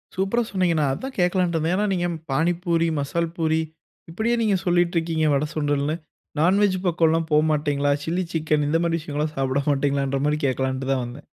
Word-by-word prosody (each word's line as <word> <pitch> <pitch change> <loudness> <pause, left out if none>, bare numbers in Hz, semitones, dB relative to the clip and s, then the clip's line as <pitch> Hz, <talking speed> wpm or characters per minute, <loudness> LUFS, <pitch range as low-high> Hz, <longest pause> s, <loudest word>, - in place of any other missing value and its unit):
சூப்பரா 195 +6 +1
சொன்னீங்க 185 -3 +1
நான் 140 -3 +2
அதான் 265 - -6
கேட்கலான்ட்டு 180 -1 +1
இருந்தேன். 160 +3 0
ஏன்னா 210 +2 +1
நீங்க 175 -1 0 0.2
பாணிபூரி, 170 +3 +1
மசால் 165 +4 -1
பூரி, 160 -1 +1 0.5
இப்படியே 220 +7 0
நீங்க 210 -3 +2
சொல்லிட்டு 175 -1 +2
இருக்கீங்க. 165 -1 0
வட, 140 +2 +1
சுண்டல்னு. 145 0 0 0.4
நான்வெஜ் 185 +3 +3
பக்கம்லாம் 165 -1 +2
போ 150 - +5
மாட்டீங்களா? 145 -1 +1
சில்லி 175 +3 -1
சிக்கன் 155 -2 +1
இந்த 165 +2 +2
மாதிரி 165 -1 +1
விஷயங்கள்லாம் 150 -1 -3
சாப்பிட 135 +1 0
மாட்டீங்களன்ற 140 -1 0
மாதிரி 150 0 0
கேட்கலான்ட்டு 130 0 -2
தான் 130 -2 0
வந்தேன். 125 +5 -10
160 Hz, 170 wpm, -23 LUFS, 145-175 Hz, 0.5 s, போ